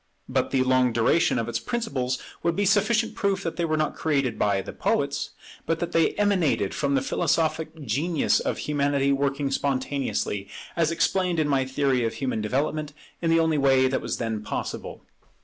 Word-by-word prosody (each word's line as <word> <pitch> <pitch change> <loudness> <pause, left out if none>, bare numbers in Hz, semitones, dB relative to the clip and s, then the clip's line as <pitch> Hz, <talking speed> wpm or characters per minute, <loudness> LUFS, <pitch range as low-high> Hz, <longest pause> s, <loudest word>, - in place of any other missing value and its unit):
But - - 0
the 130 -1 +2
long 130 -1 +3
duration 115 +6 +2
of 115 -1 -1
its 120 0 -2
principles 135 - -2 0.2
would 170 0 0
be 205 - +1
sufficient 215 +3 +2
proof 195 -1 0
that 165 - -3
they 170 - +1
were 155 -1 0
not 155 -1 0
created 135 -7 0
by 100 -1 +2
the - - -8
poets, - - -1 0.4
but 165 - +1
that 175 - -3
they 165 -1 +3
emanated 185 - +1
from 140 -1 0
the 135 - +1
philosophic 160 +2 0
genius 150 +8 +1
of - - -2
Humanity 140 -1 +1
working 140 0 0
spontaneously, 135 -7 -1 0.3
as 165 -2 +2
explained 180 +1 +1
in 155 - +2
my 135 -2 +2
theory 130 -2 +1
of 115 - -1
human 130 -5 -2
development, 145 +6 -1 0.3
in 165 - 0
the 165 0 +4
only 160 -2 +2
way 135 -1 +4
that 130 - -1
was - - -3
then 110 -2 -2
possible. - - -5
140 Hz, 185 wpm, -25 LUFS, 130-165 Hz, 0.4 s, the